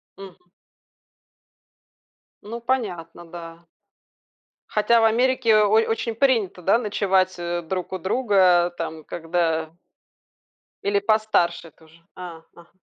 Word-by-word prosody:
Мгм. 185 -2 -14 1.9
Ну, 230 +3 -7
понятно, 190 -10 -3
да. 165 0 -11 1.0
Хотя, 215 +2 +3
в 225 - +4
Америке 240 0 +3
о 210 -1 +4
очень 225 +2 +1
принято, 225 -7 +1
да, 195 +6 +3
ночевать, 195 -4 0
э, 175 0 -3
друг 180 +2 -5
у 185 - -3
друга, 185 -4 +2
там, 160 -2 -6
когда 165 -1 -2 1.1
Или 200 0 +1
постарше 215 -6 +1
это 160 - -23
уже? 160 +1 -22
А, 175 -3 -9
ага. 170 0 -17
185 Hz, 110 wpm, -23 LUFS, 170-220 Hz, 1.9 s, в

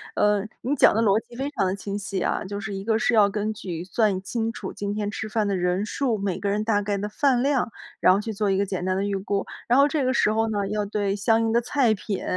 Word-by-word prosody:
呃， 210 -1 +2 0.2
你 270 +5 0
讲 - - +6
的 225 - +1
逻 210 -1 +4
辑 240 - -14
非 270 +3 -2
常 280 - 0
地 185 +1 0
清 200 0 -5
晰 195 -1 -4
啊， - - 0
就 200 +1 -5
是 200 0 -5
一 195 - -5
个 220 +1 +1
是 245 - +1
要 205 -2 +6
根 210 +2 -2
据 175 -5 -6
算 195 0 +1
清 225 +3 -2
楚 - - -6
今 205 0 -4
天 210 -1 -2
吃 215 +1 -4
饭 215 -1 0
的 200 - 0
人 180 +2 0
数、 240 +1 -1
每 195 -2 -2
个 200 - -1
人 210 +1 0
大 215 -2 +1
概 200 0 -1
的 205 +1 -3
饭 250 +3 +2
量， 270 -3 +1 0.3
然 185 - +6
后 195 - +1
去 220 - -4
做 205 -1 0
一 190 - +1
个 200 - +1
简 185 -2 -4
单 185 0 0
的 195 - 0
预 200 0 -1
估。 195 0 -2 0.2
然 245 +3 +4
后 280 - +6
这 295 -1 0
个 255 - +2
时 215 -3 +3
候 225 +1 +1
呢， 205 -2 -1
要 210 0 -1
对 200 -1 -1
相 225 +3 +2
应 225 - +1
的 235 - +4
菜 240 -2 +2
品 200 0 -4
210 Hz, 305 characters per minute, -24 LUFS, 195-225 Hz, 0.3 s, 讲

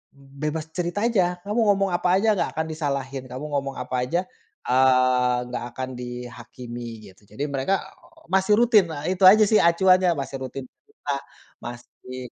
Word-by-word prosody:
bebas 145 +3 -5
cerita 180 +5 -2
aja 230 -6 +3 0.2
kamu 210 +4 -2
ngomong 195 -2 +2
apa 175 0 0
aja 210 +4 +1
gak - - 0
akan 160 0 -1
disalahin, 140 -4 -3
kamu 130 +3 -7
ngomong 135 -1 -2
apa 125 0 -5
aja, 175 +6 0 0.4
eee, 125 -1 +3
gak 125 - -4
akan 130 0 -4
dihakimi 120 -2 -8
gitu 95 - -25
jadi 140 - -6
mereka 135 +8 0 0.6
masih 190 +2 +3
rutin 230 -5 +5
nah 150 -2 -6
itu 185 +1 -4
aja 215 +1 +5
sih 215 - +6
acuannya 185 +2 +4
masih 135 0 -4
rutin 130 +1 -6
cerita 145 - -9 0.5
masih 120 +1 -9
140 Hz, 155 wpm, -24 LUFS, 125-185 Hz, 0.6 s, sih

